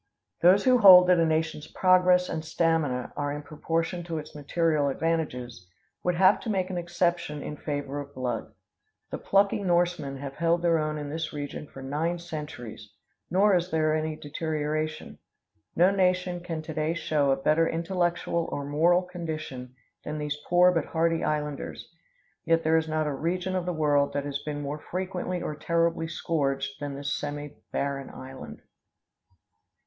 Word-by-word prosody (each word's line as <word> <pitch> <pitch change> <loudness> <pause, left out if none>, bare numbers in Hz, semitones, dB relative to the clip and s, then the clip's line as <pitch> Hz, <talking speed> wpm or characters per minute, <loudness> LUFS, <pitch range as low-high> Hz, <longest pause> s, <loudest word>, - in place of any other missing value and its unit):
Those 185 +3 +6
who 255 -1 +5
hold 185 -4 +10
that 180 -1 +5
a 165 - +4
nation's 155 -1 -1
progress 180 -1 +4
and 160 - -3
stamina 160 -6 0
are 145 0 -2
in 145 +1 -5
proportion 165 +3 -2
to 165 -2 -3
its 155 0 -7
material 150 0 +1
advantages, 125 - -2 0.3
would 180 -1 +1
have 185 +3 +5
to 230 - -6
make 190 -2 0
an 180 - -3
exception 170 -3 -1
in 150 - -5
favor 145 -1 -4
of 145 0 -12
blood. 125 -3 -3 0.6
The - - -4
plucky 200 +1 +2
Norsemen 175 -6 0
have 135 0 -7
held 170 +1 +1
their 165 -1 +3
own 155 0 -2
in 145 -1 -5
this 160 +1 -3
region 145 0 -5
for 135 - -11
nine 155 +6 -1
centuries; 150 -11 -8 0.4
nor 195 +2 +4
is 175 0 0
there 155 -2 +1
any 155 0 -1
deterioration. 155 +1 -3 0.6
No 180 +3 +5
nation 180 -2 +1
can 165 -3 -5
to 160 - -6
day 155 +2 -1
show 150 -4 +1
a 135 - +4
better 155 +4 +2
intellectual 170 0 -1
or 140 - -3
moral 170 +5 +3
condition 155 -8 -6 0.3
than 150 - -4
these 150 -1 -2
poor 180 +1 +6
but 165 -4 0
hardy 165 0 0
islanders. 150 -1 -3 0.6
Yet 165 0 +2
there 160 +1 +4
is 160 0 0
not 155 0 0
a 150 - -1
region 180 +6 -2
of 180 -1 -2
the - - +1
world 145 -3 +2
that 145 0 -2
has 140 -1 -3
been 145 -1 -4
more 145 +2 -4
frequently 180 +1 -4
or 150 - -3
terribly 165 +1 0
scourged 135 -4 -2
than 145 -1 -4
this 140 +1 -3
semibarren 145 -1 -4
island. 130 0 -10
160 Hz, 165 wpm, -27 LUFS, 145-175 Hz, 0.6 s, hold